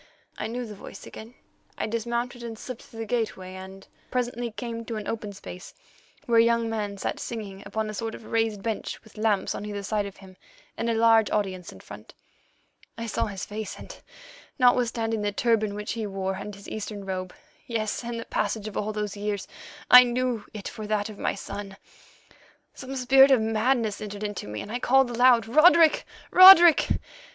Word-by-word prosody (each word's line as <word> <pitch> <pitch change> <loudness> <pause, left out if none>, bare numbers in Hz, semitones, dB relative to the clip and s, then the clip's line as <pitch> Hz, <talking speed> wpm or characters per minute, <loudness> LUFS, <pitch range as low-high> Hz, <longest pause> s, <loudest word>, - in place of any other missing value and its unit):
"I 215 - -4
knew 245 +2 -4
the 215 - -8
voice 200 - -11
again. 225 +3 -11 0.4
I - - -2
dismounted 235 +2 -3
and 230 -1 -7
slipped 255 +1 -8
through 225 - -10
the - - -3
gateway, 215 -5 -3
and 190 +1 -10 0.2
presently 245 -1 -2
came 230 0 -6
to 230 - -5
an 215 -1 -5
open 215 -2 -4
space, 185 -2 -10 0.5
where 230 -1 +4
a - - +7
young 230 0 +2
man 205 -2 -3
sat - - -3
singing 205 -4 -6
upon 220 0 -2
a 215 - -5
sort 225 +1 -4
of 225 - -12
raised 225 -3 -1
bench 225 -2 -4
with 220 - -19
lamps 215 -2 0
on - - -6
either 205 -1 -5
side 205 0 -1
of 200 - -11
him, 190 -1 -15 0.4
and 230 - -2
a 230 - +1
large 225 -1 +4
audience 190 -4 -2
in - - -14
front. - - -12 0.8
I 230 - -4
saw 225 - -1
his 195 -3 -6
face 210 -1 -6
and, - - -10 0.6
notwithstanding 235 -3 +2
the 205 0 -1
turban 215 -1 +1
which 210 0 -4
he 225 -2 -3
wore 195 -1 -3
and 205 +2 -7
his 200 - -13
Eastern 210 -2 -6
robe—yes, 195 +4 -5
and 235 0 -4
the 230 - -7
passage 210 0 -2
of 215 - -8
all 210 +1 -2
those 210 -1 -3
years—I 210 +4 +3
knew 245 -2 -1
it 210 -3 -7
for 215 -1 -7
that 210 0 -1
of 210 - -11
my - - -1
son. 200 0 -7 1.0
Some 265 0 -8
spirit 265 +1 +6
of 265 -3 +5
madness 220 0 0
entered 205 0 -6
into 205 - -4
me, 105 0 -5
and 205 - -8
I 245 - -2
called 265 0 +3
aloud, 240 -1 +5
'Roderick, 315 +6 +5 0.3
Roderick! 360 -3 +9
220 Hz, 190 wpm, -26 LUFS, 205-235 Hz, 1.0 s, Roderick